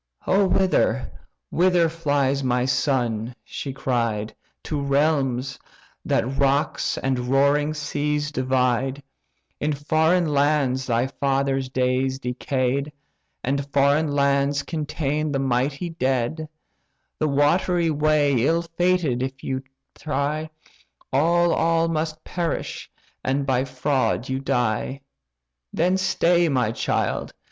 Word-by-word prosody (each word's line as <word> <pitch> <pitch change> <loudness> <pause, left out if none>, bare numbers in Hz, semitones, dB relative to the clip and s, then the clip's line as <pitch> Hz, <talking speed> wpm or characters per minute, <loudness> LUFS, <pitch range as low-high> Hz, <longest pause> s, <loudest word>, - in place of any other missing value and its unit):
"O 195 +1 +3
whither, 185 - +1 0.4
whither 175 -1 +3
flies 145 -4 0
my 125 -1 +1
son 125 -3 0
(she 140 - -6
cried) 115 -5 -1 0.3
To 150 -2 -3
realms; 140 -2 0 0.4
that 130 +3 -1
rocks 140 +1 +1
and 130 -1 -1
roaring 145 +3 +2
seas 150 0 -2
divide? 130 0 0 0.6
In 150 +1 0
foreign 160 +3 +1
lands 140 -3 +1
thy 120 0 +1
father's 135 -1 -1
days 130 +1 0
decay'd. 130 +2 -1 0.5
And 140 +2 -2
foreign 145 +2 +3
lands 140 0 +1
contain 155 -1 -2
the 140 - 0
mighty 135 +6 -1
dead. 135 +1 -1 0.7
The 155 - +1
watery 165 +4 +2
way 150 -1 +2
ill 165 +4 +2
fated 165 -6 0
if 130 0 -3
thou 130 0 -3 0.3
try, 155 +1 -2 0.6
All, 170 +4 +3
all 165 0 +2
must 155 -1 -2
perish, 175 -2 -3 0.3
and 135 +1 0
by 130 -1 +1
fraud 130 -1 -1
you 130 0 -1
die! 125 +1 -1 0.7
Then 180 +3 +1
stay, 175 -2 +2
my, 125 -6 +1
child! - - -2
140 Hz, 110 wpm, -23 LUFS, 130-155 Hz, 0.7 s, O